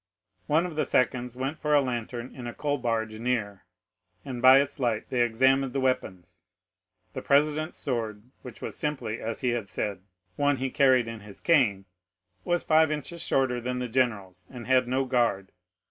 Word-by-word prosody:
One 160 Hz, +4 st, +2 dB
of 175 Hz, -3 st, -6 dB
the 155 Hz, -, +1 dB
seconds 125 Hz, -1 st, 0 dB
went 135 Hz, +4 st, -4 dB
for 150 Hz, 0 st, +1 dB
a -, -, +6 dB
lantern 120 Hz, -1 st, -4 dB
in 125 Hz, -2 st, -8 dB
a 120 Hz, -, -7 dB
coal 145 Hz, -1 st, -1 dB
barge 110 Hz, -2 st, -2 dB
near, 115 Hz, -5 st, -2 dB, 0.6 s
and 125 Hz, -3 st, -5 dB
by 130 Hz, +2 st, +8 dB
its 140 Hz, +1 st, -2 dB
light 115 Hz, -4 st, -1 dB
they 125 Hz, -2 st, +1 dB
examined 130 Hz, +3 st, +2 dB
the 135 Hz, -, 0 dB
weapons. 95 Hz, -9 st, -2 dB, 0.7 s
The -, -, -5 dB
president's 150 Hz, +3 st, +1 dB
sword, 110 Hz, -5 st, -3 dB, 0.2 s
which 125 Hz, -, -11 dB
was -, -, -5 dB
simply, 135 Hz, -7 st, -3 dB
as 115 Hz, 0 st, -4 dB
he 125 Hz, -, +1 dB
had 120 Hz, -5 st, -2 dB
said, 100 Hz, -2 st, -3 dB, 0.4 s
one 145 Hz, -1 st, +2 dB
he 130 Hz, 0 st, -3 dB
carried 130 Hz, -4 st, +4 dB
in 115 Hz, -1 st, -6 dB
his 100 Hz, -1 st, -13 dB
cane, 120 Hz, -, +2 dB, 0.6 s
was 175 Hz, 0 st, 0 dB
five 160 Hz, 0 st, +4 dB
inches 155 Hz, +3 st, -4 dB
shorter 130 Hz, -5 st, 0 dB
than 125 Hz, +1 st, -3 dB
the 125 Hz, 0 st, -3 dB
general's, 100 Hz, -8 st, -1 dB
and 120 Hz, -3 st, -9 dB
had 130 Hz, 0 st, +3 dB
no 130 Hz, +2 st, 0 dB
guard. 115 Hz, -7 st, 0 dB
125 Hz, 180 wpm, -27 LUFS, 115-135 Hz, 0.7 s, by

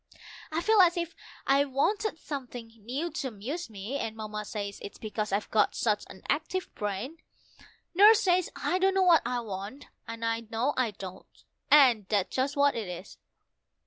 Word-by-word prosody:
I 320 Hz, +2 st, -1 dB
feel 435 Hz, +1 st, +5 dB
as 350 Hz, -1 st, +4 dB
if 340 Hz, -1 st, -3 dB, 0.3 s
I 275 Hz, +1 st, +4 dB
wanted 320 Hz, +9 st, 0 dB
something 250 Hz, -7 st, -7 dB
new 255 Hz, +10 st, -4 dB
to 280 Hz, -, -3 dB
amuse 255 Hz, -, -5 dB
me, 220 Hz, +6 st, -5 dB
and 220 Hz, -, -3 dB
Mamma 215 Hz, -1 st, -5 dB
says 200 Hz, -1 st, -5 dB
it's 200 Hz, -, -8 dB
because 215 Hz, -1 st, -4 dB
I've 200 Hz, +1 st, -1 dB
got 220 Hz, -, +3 dB
such 210 Hz, -3 st, 0 dB
an 190 Hz, -, -13 dB
active 320 Hz, +5 st, -2 dB
brain. 210 Hz, +10 st, -4 dB, 0.7 s
Nurse 420 Hz, +4 st, +7 dB
says 365 Hz, -3 st, +2 dB
I 365 Hz, -, 0 dB
don't 385 Hz, +1 st, +3 dB
know 385 Hz, -, +4 dB
what 345 Hz, -3 st, +6 dB
I 245 Hz, -1 st, -1 dB
want, 205 Hz, +5 st, -7 dB, 0.2 s
and 230 Hz, 0 st, -5 dB
I 230 Hz, 0 st, 0 dB
know 235 Hz, +6 st, 0 dB
I 255 Hz, -3 st, +1 dB
don't, 190 Hz, -2 st, -11 dB, 0.3 s
and 250 Hz, -9 st, +6 dB
that's 205 Hz, -3 st, 0 dB
just 275 Hz, +3 st, 0 dB
what 285 Hz, 0 st, +4 dB
it 225 Hz, -4 st, -4 dB
is. 180 Hz, +2 st, -8 dB
250 Hz, 175 wpm, -29 LUFS, 210-320 Hz, 0.7 s, Nurse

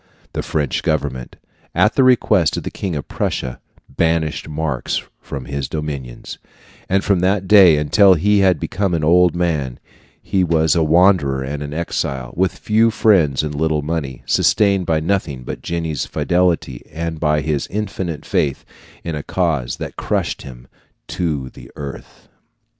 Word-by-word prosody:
The -, -, -2 dB
French 75 Hz, -4 st, -1 dB
government, 65 Hz, -1 st, -2 dB, 0.4 s
at 105 Hz, -, +3 dB
the 135 Hz, -, +3 dB
request 105 Hz, -10 st, +3 dB
of -, -, -4 dB
the -, -, -5 dB
King 95 Hz, -4 st, -4 dB
of 70 Hz, -, -5 dB
Prussia, 65 Hz, -2 st, -3 dB, 0.3 s
banished 80 Hz, +2 st, -1 dB
Marx 75 Hz, -4 st, -2 dB, 0.2 s
from 70 Hz, -3 st, -7 dB
its 70 Hz, -1 st, -3 dB
dominions; 70 Hz, -6 st, -6 dB, 0.5 s
and 95 Hz, +1 st, +2 dB
from 100 Hz, -2 st, +2 dB
that 95 Hz, +1 st, +1 dB
day 95 Hz, -6 st, +7 dB
until 95 Hz, +6 st, +5 dB
he 100 Hz, +5 st, +2 dB
had 95 Hz, -5 st, +3 dB
become 95 Hz, +1 st, -1 dB
an 80 Hz, -, -2 dB
old 90 Hz, +2 st, +4 dB
man 75 Hz, -8 st, -1 dB, 0.4 s
he 95 Hz, -1 st, 0 dB
was 80 Hz, -1 st, +2 dB
a 85 Hz, -, +2 dB
wanderer 80 Hz, -4 st, +3 dB
and 70 Hz, +2 st, -5 dB
an 75 Hz, 0 st, -5 dB
exile, 70 Hz, -5 st, -3 dB
with 95 Hz, +2 st, 0 dB
few 110 Hz, +2 st, +3 dB
friends 90 Hz, -, +3 dB
and 75 Hz, -1 st, -3 dB
little 75 Hz, 0 st, 0 dB
money, 75 Hz, -4 st, -4 dB
sustained 100 Hz, -4 st, +2 dB
by 80 Hz, -1 st, +2 dB
nothing 80 Hz, -7 st, -1 dB
but -, -, -6 dB
Jenny's 80 Hz, -3 st, -3 dB
fidelity 85 Hz, -8 st, 0 dB
and 80 Hz, -1 st, -4 dB
by 75 Hz, -1 st, +1 dB
his 75 Hz, -1 st, -2 dB
infinite 95 Hz, -6 st, -4 dB
faith 70 Hz, -2 st, -1 dB, 0.4 s
in 85 Hz, -, -4 dB
a 75 Hz, -, -3 dB
cause 75 Hz, -9 st, -1 dB
that -, -, -7 dB
crushed -, -, -2 dB
him 60 Hz, -2 st, -11 dB, 0.4 s
to 75 Hz, -7 st, -2 dB
the -, -, -13 dB
earth. 70 Hz, -2 st, -9 dB
80 Hz, 160 wpm, -19 LUFS, 70-90 Hz, 0.5 s, day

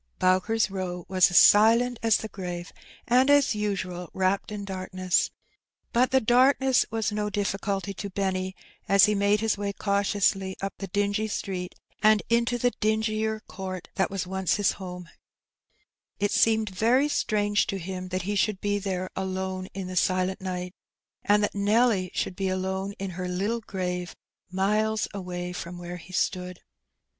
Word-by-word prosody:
Bowker's 185 Hz, +5 st, +2 dB
Bow 180 Hz, -2 st, -4 dB
was 185 Hz, -1 st, +4 dB
as 175 Hz, -, +2 dB
silent 230 Hz, +3 st, +6 dB
as 225 Hz, -1 st, +4 dB
the 220 Hz, -, -5 dB
grave, 180 Hz, -3 st, -6 dB, 0.3 s
and^ 255 Hz, +3 st, +4 dB
as 285 Hz, -3 st, +5 dB
usual, 185 Hz, -4 st, -3 dB
wrapped 190 Hz, +2 st, 0 dB
in 205 Hz, -1 st, -5 dB
darkness. 185 Hz, -1 st, -1 dB, 0.6 s
But 250 Hz, +2 st, +3 dB
the 265 Hz, -, +4 dB
darkness 260 Hz, +2 st, +4 dB
was 225 Hz, -1 st, -1 dB
no 210 Hz, 0 st, -1 dB
dij£culty 200 Hz, -1 st, -2 dB
to 200 Hz, -, -5 dB
Benny, 190 Hz, -1 st, -2 dB, 0.3 s
as 200 Hz, 0 st, +7 dB
he 210 Hz, -, +1 dB
made 200 Hz, +1 st, +2 dB
his 220 Hz, -2 st, 0 dB
way 200 Hz, -1 st, -2 dB
cautiously 200 Hz, -1 st, 0 dB
up 195 Hz, 0 st, -3 dB
the 195 Hz, -, -5 dB
dingy 205 Hz, +3 st, 0 dB
street 185 Hz, -3 st, -4 dB, 0.3 s
and 215 Hz, -1 st, +5 dB
into 235 Hz, +1 st, +2 dB
the 245 Hz, +1 st, +1 dB
dingier 220 Hz, 0 st, 0 dB
court 185 Hz, -4 st, -7 dB
that 190 Hz, -, 0 dB
was 195 Hz, -2 st, -3 dB
once 190 Hz, 0 st, 0 dB
his 205 Hz, -2 st, +2 dB
homa 180 Hz, -2 st, -8 dB, 1.1 s
It 205 Hz, 0 st, +1 dB
seemed 220 Hz, -1 st, +3 dB
very 240 Hz, +9 st, +3 dB
strange 205 Hz, -7 st, +1 dB
to 195 Hz, -, -2 dB
him 185 Hz, 0 st, -5 dB
that 185 Hz, 0 st, -3 dB
he 205 Hz, +3 st, -2 dB
should 200 Hz, 0 st, +1 dB
be 205 Hz, 0 st, 0 dB
there 185 Hz, -2 st, -3 dB
alone 190 Hz, 0 st, -3 dB
Adrift. -, -, -15 dB
201 -, -, -2 dB
in -, -, -6 dB
the 185 Hz, -, -6 dB
silent 185 Hz, +1 st, +1 dB
nighty 180 Hz, -1 st, -4 dB, 0.5 s
and 205 Hz, +1 st, +4 dB
that -, -, 0 dB
Nelly 205 Hz, -1 st, +2 dB
should 180 Hz, -, -2 dB
be 195 Hz, 0 st, -2 dB
alone 190 Hz, +1 st, -2 dB
in 195 Hz, -1 st, -5 dB
her 180 Hz, +1 st, -4 dB
Uttle 200 Hz, +6 st, -1 dB
grave 180 Hz, -3 st, -4 dB, 0.3 s
miles 210 Hz, +3 st, +1 dB
away 180 Hz, -2 st, -5 dB
from 175 Hz, 0 st, -6 dB
where 175 Hz, 0 st, -7 dB
he 180 Hz, +1 st, -13 dB
stood. 180 Hz, -1 st, -2 dB
195 Hz, 170 wpm, -26 LUFS, 185-215 Hz, 1.1 s, as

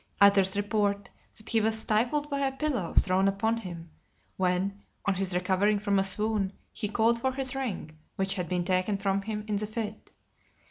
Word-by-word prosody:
Others 200 Hz, -1 st, +5 dB
report, 205 Hz, -1 st, 0 dB, 0.3 s
that 215 Hz, -, -16 dB
he 225 Hz, -2 st, +3 dB
was 220 Hz, +1 st, +1 dB
stifled 240 Hz, +7 st, +1 dB
by 280 Hz, -1 st, -2 dB
a 275 Hz, -1 st, +1 dB
pillow 265 Hz, -, -2 dB
thrown 190 Hz, +1 st, +4 dB
upon 220 Hz, +4 st, +1 dB
him, 170 Hz, -6 st, -8 dB, 0.4 s
when, 190 Hz, +2 st, 0 dB, 0.2 s
on 200 Hz, -, +3 dB
his 190 Hz, -1 st, -2 dB
recovering 190 Hz, +3 st, +2 dB
from 200 Hz, -1 st, +1 dB
a -, -, +3 dB
swoon, 205 Hz, 0 st, +1 dB, 0.2 s
he 210 Hz, -, -2 dB
called 230 Hz, +2 st, +2 dB
for 260 Hz, +1 st, +1 dB
his 265 Hz, -1 st, -3 dB
ring, 215 Hz, -, -4 dB, 0.2 s
which 195 Hz, 0 st, +1 dB
had 180 Hz, -5 st, -3 dB
been 180 Hz, -1 st, 0 dB
taken 185 Hz, +2 st, +1 dB
from 195 Hz, 0 st, 0 dB
him 210 Hz, +1 st, -4 dB
in 210 Hz, -1 st, 0 dB
the 210 Hz, +1 st, -3 dB
fit. 215 Hz, -1 st, -5 dB
200 Hz, 185 wpm, -28 LUFS, 190-220 Hz, 0.4 s, Others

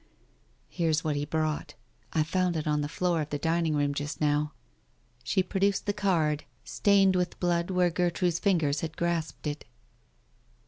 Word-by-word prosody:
Here's 165 Hz, -2 st, 0 dB
what 155 Hz, -2 st, 0 dB
he 145 Hz, 0 st, -1 dB
brought. 155 Hz, 0 st, -2 dB, 0.4 s
I 155 Hz, -, +2 dB
found 180 Hz, +1 st, 0 dB
it 155 Hz, -, -3 dB
on 150 Hz, -1 st, +1 dB
the 145 Hz, -, -3 dB
floor 175 Hz, 0 st, 0 dB
of 150 Hz, -, -4 dB
the 145 Hz, -, -2 dB
dining 165 Hz, +1 st, +1 dB
room 145 Hz, -1 st, +1 dB
just 145 Hz, +1 st, -4 dB
now." 150 Hz, 0 st, +1 dB, 0.7 s
She 185 Hz, +10 st, +1 dB
produced 195 Hz, +1 st, 0 dB
the 205 Hz, -, 0 dB
card, 165 Hz, -7 st, +1 dB, 0.2 s
stained 195 Hz, -2 st, +3 dB
with 180 Hz, -1 st, -1 dB
blood 175 Hz, -1 st, +1 dB
where 180 Hz, -2 st, +2 dB
Gertrude's 175 Hz, 0 st, 0 dB
fingers 160 Hz, -8 st, +1 dB
had 160 Hz, -1 st, -5 dB
grasped 170 Hz, -2 st, -2 dB
it. 150 Hz, 0 st, -3 dB
165 Hz, 165 wpm, -28 LUFS, 150-180 Hz, 0.7 s, stained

